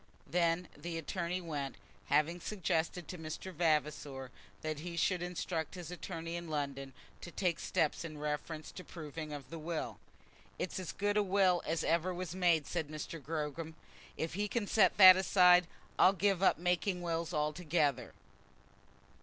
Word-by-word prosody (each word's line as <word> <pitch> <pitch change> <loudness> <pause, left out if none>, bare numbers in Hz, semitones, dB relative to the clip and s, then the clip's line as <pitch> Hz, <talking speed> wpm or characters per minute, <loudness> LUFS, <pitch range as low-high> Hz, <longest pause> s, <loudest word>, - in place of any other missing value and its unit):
Then 170 +2 +1
the 170 -1 -5
attorney 175 +1 -2
went, 145 -5 -4 0.3
having 155 +4 +2
suggested 175 -4 -1
to 180 - -7
Mr. 160 +4 -6
Vavasor 150 -5 0 0.3
that 155 -1 -3
he 170 +1 -6
should 180 +1 +1
instruct 175 -2 -3
his 175 -2 -7
attorney 165 0 -5
in 170 -1 -5
London 140 -3 -3 0.3
to - - -7
take 175 -1 -1
steps 165 -4 0
in 155 -2 -7
reference 150 +1 -4
to - - -8
the - - -19
proving 155 -1 -6
of 145 -1 -8
the 165 - -6
will. 160 +1 -4 0.6
"It's 185 - -3
as 185 - -4
good 205 +1 0
a - - +5
will 185 -2 +3
as 165 0 0
ever 170 +2 +1
was 180 -2 -4
made," 175 -5 +3
said 165 -4 -2
Mr. 155 +1 -6
Gogram. 155 +1 -4 0.4
"If 160 0 -2
he 205 +3 -1
can 225 0 -1
set 195 -2 +4
that 185 -2 +11
aside, 180 -2 +6 0.3
I'll 190 - +7
give 195 -1 +1
up 190 - +4
making 180 +1 0
wills 165 0 -2
altogether." 150 -3 0
170 Hz, 160 wpm, -34 LUFS, 155-180 Hz, 0.6 s, that